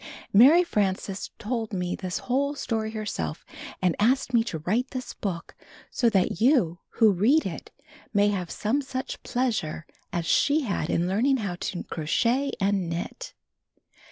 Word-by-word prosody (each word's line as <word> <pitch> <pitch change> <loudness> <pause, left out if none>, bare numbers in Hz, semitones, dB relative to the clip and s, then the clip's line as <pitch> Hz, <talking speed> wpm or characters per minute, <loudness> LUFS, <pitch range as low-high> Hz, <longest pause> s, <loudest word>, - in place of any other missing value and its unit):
Mary 280 - +8
Frances 195 - -1
told 225 -1 -3
me 180 -1 -1
this 185 -1 -4
whole 280 +3 0
story 225 -5 -2
herself, 210 - -4 0.4
and 180 -2 +3
asked 250 +4 +2
me 230 -1 +5
to 170 - -3
write 215 - -1
this 255 -2 -6
book 175 -5 -5 0.4
so 240 - +2
that 190 -4 +1
you 225 - +3
who 220 -2 +5
read 235 - +3
it 170 -5 -6 0.4
may 205 -1 +3
have 185 -4 -2
some 245 +7 0
such 260 -1 -5
pleasure 220 -11 -2 0.3
as 170 -1 -2
she 290 - +3
had 195 - -2
in 170 +1 +1
learning 240 +9 +2
how 200 -6 -3
to 180 - -4
crochet 235 - 0
and 195 -3 +1
knit. 175 - -5
215 Hz, 155 wpm, -26 LUFS, 180-255 Hz, 0.4 s, Mary